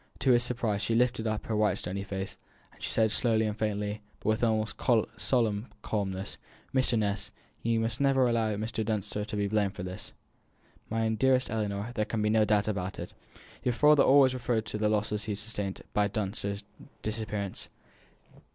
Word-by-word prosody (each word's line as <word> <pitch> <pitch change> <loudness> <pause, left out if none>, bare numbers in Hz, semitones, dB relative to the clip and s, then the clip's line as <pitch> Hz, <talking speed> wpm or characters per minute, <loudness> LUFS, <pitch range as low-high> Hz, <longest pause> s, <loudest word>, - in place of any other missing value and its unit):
To 130 - +4
his 120 -1 +5
surprise 115 -4 0
she 115 +3 +1
lifted 120 -1 +2
up 110 -1 -2
her 110 - -1
white 105 -2 +2
stony 95 +1 -3
face, 95 -1 -5 0.4
and - - -21
said 110 -1 +2
slowly 110 -2 +2
and 105 -1 -1
faintly, 105 -1 -2 0.2
but - - -2
with 110 +2 +1
almost 110 -1 +1 0.4
solemn 115 -3 +1 0.2
calmness: 95 -2 -2 0.4
"Mr. 130 -3 +3
Ness, 100 -2 -1 0.3
you 115 0 +1
must 115 +3 -1
never 135 -2 +4
allow 115 -3 +1
Mr. 110 +2 -2
Dunster 105 -1 -1
to 105 +1 -5
be 100 -1 +1
blamed 100 -2 +1
for 95 - -5
this!" 90 +1 -6 0.8
"My 115 0 +1
dear 130 +4 +4
Ellinor, 105 0 -2
there 110 -3 0
can 110 -1 -2
be 105 - +2
no 110 -1 +4
doubt 105 0 +2
about 95 -3 -2
it. - - -7 0.5
Your 125 - +1
father 150 +3 +6
himself - - +4
always 135 -2 +6
referred 120 -3 -1
to 105 - -4
the 105 0 +2
losses 105 0 0
he 110 - -2
had - - -4
sustained 105 -3 -4
by 105 0 +3
Dunster's 100 0 -3 0.4
disappearance." 105 -2 -3
110 Hz, 185 wpm, -29 LUFS, 105-115 Hz, 0.8 s, father